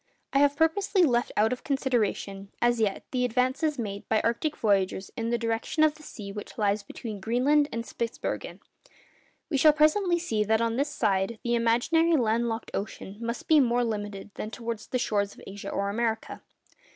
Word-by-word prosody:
I 275 - +4
have 285 0 +4
purposely 365 +5 +2
left 245 -6 +2
out 220 +3 +3
of 250 - -7
consideration, 230 -7 -1
as 240 -1 +2
yet, 210 -3 0
the 250 -1 0
advances 255 +5 +1
made 205 -4 -5
by 220 - +3
arctic 235 +7 -1
voyagers 195 -2 +1
in 230 -2 -2
the 235 - +1
direction 230 +6 0
of 310 -1 +4
the 305 - -17
sea 210 -9 -8
which 205 +1 -8
lies 205 -1 +1
between 210 +1 -7
Greenland 265 +8 +2
and 230 0 -3
Spitzbergen. 230 -1 -4 0.9
We 280 - +2
shall 305 +2 +6
presently 345 +4 +3
see 225 -11 0
that 220 +1 +2
on 230 0 0
this 280 +3 0
side 210 -5 0
the 235 - 0
imaginary 245 +9 +3
land 235 -2 +1
locked 225 0 -4
ocean 200 0 -5
must 235 +1 -4
be 315 -2 +6
more 245 -2 +3
limited 205 -3 -4
than 215 - -5
towards 230 -1 -5
the 255 - -1
shores 205 -4 0
of - - -15
Asia 200 0 -7
or 200 - -1
America. 225 0 -2
235 Hz, 185 wpm, -27 LUFS, 210-275 Hz, 0.9 s, shall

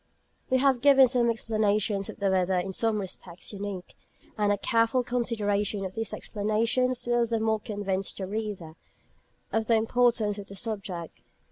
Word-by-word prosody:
We 260 - +3
have 260 -2 +3
given 270 -1 +7
some 240 -1 +2
explanations 215 -3 0
of - - -8
the 200 -1 +1
weather 185 0 +2
in 190 +2 -2
some 225 +2 +1
respects 185 -1 -7
unique; 200 -3 -6 0.4
and 210 -1 +1
a 205 - +2
careful 230 +4 +2
consideration 210 -4 -1
of 185 - -5
these 225 +1 -3
explanations 230 +4 0
will 240 -1 +2
the 230 -1 0
more 220 0 +1
convince 200 -3 -2
the 190 - -5
reader 200 -5 -5 0.8
of 220 -1 0
the 230 - +4
importance 225 -2 +2
of 200 - -8
the 200 - -10
subject. 190 -6 -4
215 Hz, 160 wpm, -27 LUFS, 195-230 Hz, 0.8 s, given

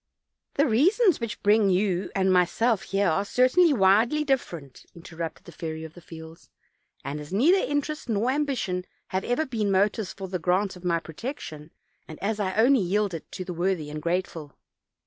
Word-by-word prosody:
"The 285 - +3
reasons 360 - +3
which 230 -1 -5
bring 205 0 +4
you 185 0 +1
and 190 -1 +2
myself 190 +5 +2
here 200 0 +1
are 175 +4 +1
cer 250 +5 +2
tainly 345 +5 +4
widely 225 +6 +3
different," 170 - -3
interrupted 165 -1 -7
the - - -11
Fairy 160 -1 -6
of 160 -1 -9
the 175 - -14
Fields; 160 0 -12 0.6
"as 150 +2 -6
neither 300 - +4
interest 290 -3 -2
nor 225 +3 +1
ambition 260 -11 -1 0.2
have 190 0 -2
ever 245 +6 0
been 220 -6 -2
motives 200 +1 +1
for 195 -1 -7
the 185 -1 -3
grant 185 +3 0
of 180 - -13
my 170 -2 +1
protection, 160 - -7 0.4
and 155 - -9
as 215 +2 -2
I 190 -2 -1
only 245 +5 +5
yield 200 +1 0
it 165 - -8
to 185 - -5
the 180 - -5
worthy 175 -3 -1
and 150 0 -6
grateful." 170 -3 -3
195 Hz, 180 wpm, -26 LUFS, 170-240 Hz, 0.6 s, only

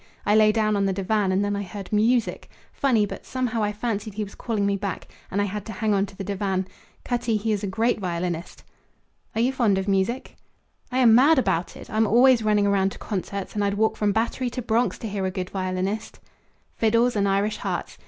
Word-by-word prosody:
I 205 - +3
lay 215 0 +6
down 215 -1 +1
on 200 -1 +1
the 195 - 0
divan, 195 +1 0
and 195 +2 +1
then 205 0 -1
I 200 - -2
heard 195 +1 -7
music. 230 +2 +1 0.2
Funny, 240 -7 +2
but - - -8
somehow 250 -3 -2
I 210 0 +1
fancied 210 -1 -3
he 215 - -2
was 200 - -9
calling 215 -4 -2
me 200 0 +1
back; 200 -1 -4 0.2
and 200 - -2
I 205 - +2
had 205 0 -4
to 220 - -5
hang 215 +2 0
on 200 0 +1
to 195 - -15
the 195 - -4
divan. 190 -1 -2 0.4
Cutty, 240 -3 0
he 220 +2 -1
is 210 -1 -1
a - - -1
great 225 +4 0
violinist." 175 -2 -4 0.7
"Are 225 - +1
you 255 +3 +2
fond 225 -7 +2
of 190 +1 -2
music?" 195 +6 -1 0.5
"I 255 - -1
am 240 -4 +6
mad 285 +7 +6
about 175 -9 0
it! - - -11
I'm 220 0 +1
always 245 +2 +5
running 210 -2 +2
round 195 -1 +2
to - - -11
concerts; 200 -1 -4
and 205 - -1
I'd 200 0 0
walk 220 +1 +1
from 210 -1 +1
Battery 235 +4 -1
to 250 - -5
Bronx 230 +2 +1
to 225 - -6
hear 195 -2 -2
a - - 0
good 185 -1 -5
violinist." 190 +3 -3 0.6
Fiddles 230 +2 +2
and 200 -1 +2
Irish 200 +2 +1
hearts. - - -4
210 Hz, 225 wpm, -24 LUFS, 195-225 Hz, 0.7 s, lay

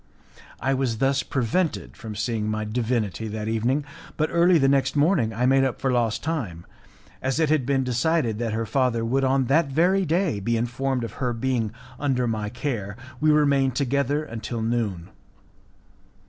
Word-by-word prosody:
I 135 +2 0
was 130 -4 0
thus 135 +3 +2
prevented 140 +7 -1
from 110 -2 -8
seeing 110 0 -1
my 110 0 -2
divinity 110 -2 -1
that 105 0 -4
evening, 120 +6 0 0.3
but 155 0 +1
early 170 +1 +5
the 135 -3 +3
next 135 0 +2
morning 145 - +3
I 120 +3 0
made 135 +1 +4
up 130 -2 -1
for 135 - 0
lost 120 -3 0
time, 110 - -3 0.4
and - - -27
as 135 +3 0
it 160 -2 +2
had 145 -5 +2
been 135 -1 +2
decided 125 -2 0
that 115 -2 -1
her 115 +1 -1
father 120 -2 +1
would 135 +4 +1
on 135 0 +2
that 150 +5 +3
very 180 +8 +2
day 165 - +1
be 115 +4 0
informed 125 +2 -1
of 115 - -4
her 125 -2 0
being 115 -2 -1 0.3
under 130 -4 +1
my 110 -2 -2
care, 110 -5 -4 0.2
we 155 - +3
remained 140 -4 +3
together 140 +2 0
until 115 -3 -5
noon. 110 -7 -2
125 Hz, 175 wpm, -24 LUFS, 115-140 Hz, 0.4 s, early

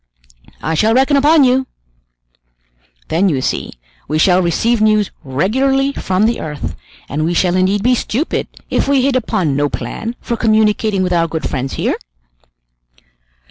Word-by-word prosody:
"I 160 - -1
shall 215 +8 +2
reckon 270 +3 +3
upon 295 +2 +5
you! 260 0 +2 1.4
Then, 185 +5 +2
you 140 -6 0
see, - - -3 0.3
we 155 - -1
shall 180 +3 +4
receive 220 +6 +1
news 215 -2 +2
regularly 265 - +1
from 190 -2 0
the 230 +1 0
earth, 150 -2 -5 0.3
and 150 +3 -2
we 170 +2 0
shall 180 +1 +2
indeed 190 +2 +1
be 250 +2 +3
stupid 250 +5 -2 0.2
if - - +1
we 275 -2 +3
hit 275 -1 +1
upon 185 - 0
no 145 +1 +1
plan 230 +10 -5
for 235 - -3
communicating 215 -3 +1
with 180 -1 -1
our 165 -1 +2
good 160 -1 -3
friends 135 -1 -3
here!" - - -1
210 Hz, 155 wpm, -16 LUFS, 165-250 Hz, 1.4 s, upon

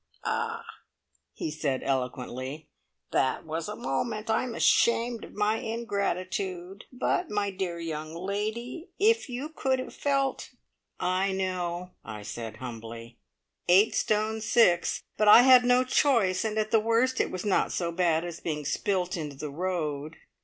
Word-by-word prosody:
"Ah," 460 0 -2 0.7
he 155 - -4
said 145 -4 -2
eloquently, 130 +2 -3 0.4
"that 130 - +1
was 160 +3 -4
a 210 - -4
moment! 215 - -2
I 220 - +2
am 240 -3 -5
ashamed 235 0 +3
of - - -11
my 210 +1 +1
ingratitude; 200 -4 -3
but, 290 +7 -1
my 205 -1 -1
dear 185 -3 -3
young 160 -1 -5
lady, 215 - -4
if 450 - +3
you 250 +4 -4
could 265 -4 0
have 255 - -6
felt 275 -2 0 0.3
" - - -56
"I 185 +2 +1
know," 180 -1 -2
I 105 -2 -8
said 110 +1 -6
humbly. 115 -1 -8 0.5
"Eight 190 +5 +5
stone 215 +1 0
six. 215 -6 +3
But 215 - +2
I 230 +3 +10
had 255 -1 +8
no 250 +1 +4
choice; 235 -8 +2
and 220 -1 -2
at 215 0 0
the 225 - +5
worst, 230 +4 +2
it - - -1
was 185 +1 -5
not 200 - +2
so 170 -1 -1
bad 170 -1 +1
as 170 -1 -6
being 150 -3 -3
spilt 185 +3 0
into 150 -4 -5
the 145 +2 -6
road." 155 -3 -3
190 Hz, 155 wpm, -28 LUFS, 160-230 Hz, 0.7 s, I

